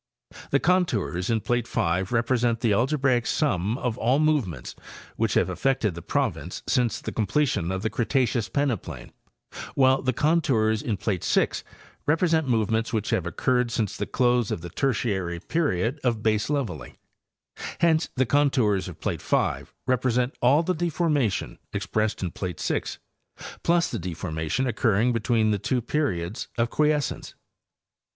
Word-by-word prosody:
The 140 Hz, -, +3 dB
contours 125 Hz, -, +1 dB
in 115 Hz, -2 st, +1 dB
plate 120 Hz, +1 st, 0 dB
5 90 Hz, +3 st, 0 dB
represent 120 Hz, -1 st, +1 dB
the 115 Hz, -4 st, +3 dB
algebraic 130 Hz, +1 st, +2 dB
sum 110 Hz, -, 0 dB
of 125 Hz, -4 st, -3 dB
all 125 Hz, +4 st, +3 dB
movements 135 Hz, -, 0 dB, 0.4 s
which -, -, 0 dB
have -, -, +3 dB
affected 135 Hz, -7 st, 0 dB
the 85 Hz, -, -8 dB
province 90 Hz, -, -2 dB
since 125 Hz, -4 st, +1 dB
the -, -, -5 dB
comple 140 Hz, +8 st, +1 dB
tion 90 Hz, -7 st, -1 dB
of 95 Hz, +1 st, -3 dB
the 110 Hz, -, +1 dB
Cretaceous 120 Hz, -2 st, 0 dB
peneplain, 95 Hz, -, -2 dB, 0.6 s
while 130 Hz, 0 st, +4 dB
the 130 Hz, -, +1 dB
contours 130 Hz, -8 st, +2 dB
in 110 Hz, -4 st, -2 dB
plate 95 Hz, -3 st, -2 dB
6 -, -, +1 dB, 0.4 s
represent 160 Hz, 0 st, +2 dB
movements 115 Hz, -1 st, +1 dB
which 110 Hz, -3 st, -1 dB
have 90 Hz, -, 0 dB
occurred 125 Hz, +7 st, +1 dB
since 110 Hz, -4 st, -1 dB
the -, -, -3 dB
close 120 Hz, -3 st, +2 dB
of -, -, -3 dB
the 85 Hz, 0 st, -8 dB
Tertiary 95 Hz, -8 st, -1 dB
period 135 Hz, -, -1 dB
of 115 Hz, -4 st, 0 dB
baseleveling; 110 Hz, -, -1 dB, 0.9 s
hence 160 Hz, -2 st, +3 dB
the 130 Hz, -, +2 dB
contours 125 Hz, -8 st, +2 dB
of -, -, -9 dB
plate -, -, -3 dB
5 -, -, 0 dB
represent. 125 Hz, 0 st, +1 dB
all 140 Hz, +7 st, +4 dB
the 185 Hz, -, 0 dB
deformation 155 Hz, -, 0 dB
expressed 110 Hz, -2 st, -1 dB
in 90 Hz, -, -2 dB
plate 90 Hz, -3 st, -5 dB
6 -, -, -2 dB, 0.6 s
plus 170 Hz, +1 st, +2 dB
the -, -, -3 dB
de 90 Hz, -1 st, -5 dB
formation 80 Hz, +9 st, -2 dB
occurring 115 Hz, 0 st, +2 dB
between 115 Hz, -1 st, +2 dB
the 105 Hz, -, 0 dB
two 125 Hz, +6 st, 0 dB
periods 120 Hz, -, -2 dB
of 115 Hz, 0 st, +1 dB
quiescence. 150 Hz, -2 st, 0 dB
120 Hz, 150 wpm, -25 LUFS, 100-135 Hz, 0.9 s, while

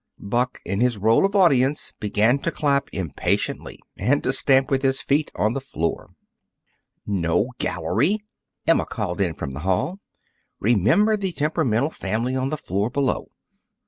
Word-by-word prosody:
Buck, 120 Hz, +5 st, -2 dB
in 100 Hz, +1 st, -2 dB
his 125 Hz, -3 st, +2 dB
role 110 Hz, -, +4 dB
of 200 Hz, -, -8 dB
audience, 145 Hz, -7 st, +3 dB
began 110 Hz, +5 st, +2 dB
to 165 Hz, -, -1 dB
clap 140 Hz, -3 st, 0 dB
impatiently 90 Hz, -7 st, -2 dB, 0.2 s
and 130 Hz, +9 st, +1 dB
to -, -, +1 dB
stamp 135 Hz, -1 st, +3 dB
with 135 Hz, -1 st, +2 dB
his 135 Hz, 0 st, +1 dB
feet 140 Hz, +3 st, 0 dB
on 110 Hz, +2 st, +1 dB
the 135 Hz, -, -3 dB
floor. 85 Hz, -, -4 dB, 0.9 s
"No 100 Hz, +4 st, 0 dB
gallery!" 135 Hz, -, +1 dB, 0.5 s
Emma 165 Hz, -, +3 dB
called 100 Hz, -4 st, -3 dB
in 85 Hz, -5 st, 0 dB
from 70 Hz, -, -5 dB
the 65 Hz, -, -7 dB
hall. 95 Hz, -, -1 dB, 0.6 s
"Remember 120 Hz, -, +3 dB
the 190 Hz, -3 st, -2 dB
temperamental 150 Hz, -4 st, 0 dB
family 115 Hz, +5 st, -2 dB
on 130 Hz, +1 st, -1 dB
the 155 Hz, -, -2 dB
floor 100 Hz, -, -2 dB
below!" 135 Hz, 0 st, -1 dB
125 Hz, 150 wpm, -23 LUFS, 100-145 Hz, 0.9 s, role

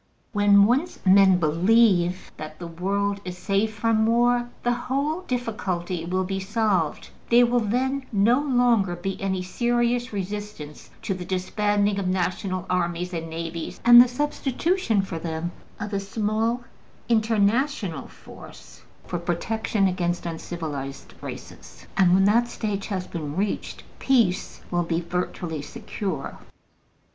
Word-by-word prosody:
When 205 Hz, -1 st, +6 dB
once 270 Hz, +11 st, +1 dB
men 190 Hz, -1 st, +6 dB
BELIEVE 180 Hz, +2 st, +3 dB
that 155 Hz, 0 st, -8 dB
the 175 Hz, -, -7 dB
world 200 Hz, +4 st, -2 dB
is 180 Hz, -1 st, -6 dB
safe 200 Hz, +3 st, 0 dB
from 220 Hz, 0 st, +1 dB
war, 240 Hz, +1 st, +2 dB
the 240 Hz, -, +2 dB
whole 280 Hz, +7 st, -2 dB
difficulty 190 Hz, -, -3 dB
will 185 Hz, +2 st, 0 dB
be 195 Hz, +1 st, -3 dB
solved: 195 Hz, -5 st, -1 dB, 0.2 s
there 240 Hz, +1 st, +6 dB
will 240 Hz, +1 st, +2 dB
then 260 Hz, +5 st, -1 dB
no 225 Hz, +6 st, +3 dB
longer 245 Hz, -9 st, +2 dB
be 190 Hz, +2 st, -5 dB
any 190 Hz, -1 st, -1 dB
serious 240 Hz, +4 st, 0 dB
resistance 200 Hz, -6 st, -6 dB
to 195 Hz, -, -1 dB
the 185 Hz, -1 st, -6 dB
disbanding 205 Hz, +2 st, 0 dB
of 190 Hz, -, -2 dB
national 185 Hz, 0 st, -1 dB
armies 180 Hz, 0 st, -1 dB
and 165 Hz, -1 st, -4 dB
navies, 165 Hz, 0 st, -5 dB
and 240 Hz, 0 st, +10 dB
the 250 Hz, -, +5 dB
substitution 270 Hz, -, 0 dB
for 170 Hz, -4 st, -5 dB
them 160 Hz, +1 st, -4 dB, 0.3 s
of 210 Hz, -1 st, -5 dB
a 200 Hz, -, +1 dB
small 220 Hz, +4 st, -1 dB, 0.4 s
international 220 Hz, -, +1 dB
force -, -, -14 dB, 0.2 s
for 175 Hz, -, -3 dB
protection 195 Hz, +4 st, 0 dB
against 175 Hz, -2 st, -1 dB
uncivilized 155 Hz, -5 st, -6 dB
races. -, -, -10 dB
And 180 Hz, -1 st, +5 dB
when 190 Hz, 0 st, +4 dB
that 235 Hz, +4 st, +4 dB
stage 210 Hz, -4 st, -3 dB
has 185 Hz, -3 st, -3 dB
been 155 Hz, -5 st, -5 dB
reached, 200 Hz, +2 st, -3 dB, 0.2 s
peace 230 Hz, -9 st, +1 dB
will 175 Hz, -1 st, +1 dB
be 165 Hz, -1 st, -1 dB
virtually 175 Hz, -2 st, -3 dB
secure. 210 Hz, +3 st, -5 dB
200 Hz, 135 wpm, -24 LUFS, 180-230 Hz, 0.4 s, and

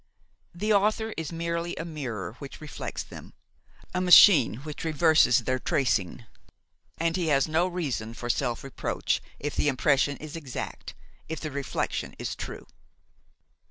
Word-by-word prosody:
The 210 Hz, +5 st, +1 dB
author 215 Hz, +2 st, +2 dB
is 160 Hz, -1 st, -4 dB
merely 170 Hz, +1 st, -2 dB
a 165 Hz, -, -5 dB
mirror 130 Hz, -, -5 dB
which 140 Hz, -2 st, -9 dB
reflects 155 Hz, -1 st, -6 dB
them, -, -, -12 dB, 0.6 s
a 180 Hz, -, 0 dB
machine 180 Hz, -, +8 dB
which 150 Hz, -1 st, -7 dB
reverses 155 Hz, -6 st, +4 dB
their 130 Hz, +2 st, 0 dB
tracing, 120 Hz, -4 st, 0 dB, 0.7 s
and 165 Hz, 0 st, 0 dB
he 175 Hz, -3 st, -1 dB
has 140 Hz, -2 st, +3 dB
no 160 Hz, +3 st, +2 dB
reason 140 Hz, -11 st, -3 dB
for 120 Hz, -, -6 dB
self 120 Hz, 0 st, -1 dB
reproach 135 Hz, -2 st, -2 dB, 0.2 s
if 145 Hz, 0 st, -4 dB
the -, -, +1 dB
impression 140 Hz, 0 st, +2 dB
is 155 Hz, 0 st, -8 dB
exact, 145 Hz, -6 st, -6 dB, 0.3 s
if 160 Hz, -, -4 dB
the 155 Hz, -, -5 dB
reflection 140 Hz, -1 st, -3 dB
is -, -, -4 dB
true. -, -, -7 dB
155 Hz, 145 wpm, -27 LUFS, 130-170 Hz, 0.7 s, machine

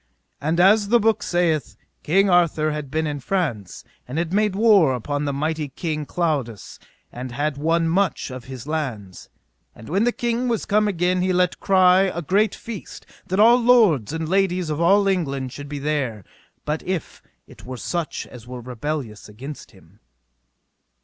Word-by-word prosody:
And 160 Hz, +4 st, 0 dB
as 200 Hz, +3 st, +5 dB
the 240 Hz, +3 st, +4 dB
book 225 Hz, 0 st, +2 dB
saith, 170 Hz, -4 st, 0 dB, 0.3 s
King 195 Hz, +6 st, +3 dB
Arthur 170 Hz, -4 st, +2 dB
had 150 Hz, -2 st, -5 dB
been 160 Hz, +3 st, -1 dB
in 145 Hz, -1 st, -3 dB
France, 135 Hz, -, -3 dB, 0.2 s
and 130 Hz, +5 st, -5 dB
had 170 Hz, +1 st, -2 dB
made 210 Hz, -1 st, +1 dB
war 200 Hz, -, +5 dB
upon 145 Hz, +4 st, -3 dB
the 140 Hz, -, -1 dB
mighty 155 Hz, +1 st, -2 dB
King 155 Hz, +1 st, -4 dB
Claudas, 140 Hz, -, -3 dB, 0.3 s
and 125 Hz, +1 st, -7 dB
had 145 Hz, +3 st, -2 dB
won 165 Hz, +3 st, +1 dB
much 180 Hz, -4 st, 0 dB
of 125 Hz, -1 st, -8 dB
his 130 Hz, -2 st, -8 dB
lands. 125 Hz, -, -5 dB, 0.5 s
And 110 Hz, -, -12 dB
when 195 Hz, +6 st, +1 dB
the 245 Hz, -, +3 dB
king 240 Hz, +1 st, -1 dB
was 230 Hz, -3 st, -1 dB
come 210 Hz, +1 st, +2 dB
again 180 Hz, -1 st, 0 dB
he 185 Hz, +1 st, +1 dB
let 180 Hz, -1 st, +1 dB
cry 185 Hz, -1 st, +4 dB
a 175 Hz, -, -3 dB
great 200 Hz, +6 st, +2 dB
feast, 225 Hz, -4 st, -9 dB, 0.2 s
that 190 Hz, +2 st, -1 dB
all 235 Hz, +3 st, +7 dB
lords 220 Hz, -, +4 dB
and 160 Hz, 0 st, -3 dB
ladies 185 Hz, -2 st, +1 dB
of 150 Hz, +2 st, -2 dB
all 195 Hz, +4 st, +4 dB
England 140 Hz, -9 st, -1 dB
should 145 Hz, 0 st, -8 dB
be 145 Hz, -, -5 dB
there, 135 Hz, -, -2 dB, 0.4 s
but 150 Hz, +1 st, -2 dB
if 185 Hz, -3 st, -4 dB, 0.2 s
it -, -, -16 dB
were 130 Hz, 0 st, -7 dB
such 170 Hz, +4 st, -3 dB
as 120 Hz, -2 st, -13 dB
were 125 Hz, 0 st, -7 dB
rebellious 125 Hz, -2 st, -5 dB
against 135 Hz, +8 st, -9 dB
him. 95 Hz, -3 st, -21 dB
160 Hz, 175 wpm, -22 LUFS, 135-190 Hz, 0.5 s, all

